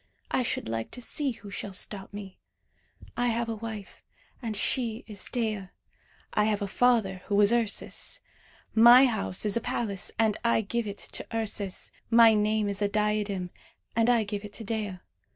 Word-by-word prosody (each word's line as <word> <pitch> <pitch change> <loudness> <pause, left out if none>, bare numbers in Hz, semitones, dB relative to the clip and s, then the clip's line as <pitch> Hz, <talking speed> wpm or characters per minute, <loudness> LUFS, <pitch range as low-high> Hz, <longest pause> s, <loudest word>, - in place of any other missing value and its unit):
I - - +2
should 240 - -2
like 115 0 -3
to - - -6
see 275 +4 0
who 205 -2 -12
shall 200 0 -5
stop 195 +1 -2
me. 200 -2 -9 0.8
I 245 0 +1
have 235 0 0
a 225 - -2
wife, 215 -2 -8 0.4
and 225 -4 -2
she 230 0 0
is 205 -3 -4
Dea. 215 -6 -2 0.7
I 210 - +3
have 210 -1 0
a - - -2
father, 215 -4 +2
who 205 0 +2
is 205 +2 +5
Ursus. 230 -4 0 0.5
My 240 +4 +8
house 215 -5 0
is 210 - +3
a 235 - +1
palace, 205 -4 -1
and 220 -2 +2
I 235 -1 +3
give 225 +2 -2
it 200 0 -5
to - - -6
Ursus. 205 -3 -2 0.2
My 230 -1 +7
name 215 0 +1
is 200 0 -2
a 205 - +3
diadem, 205 -3 -1 0.4
and 230 +1 +3
I 235 -2 +4
give 205 0 -4
it 205 0 -9
to 225 - -7
Dea. 210 -3 -3
215 Hz, 180 wpm, -28 LUFS, 200-230 Hz, 0.8 s, My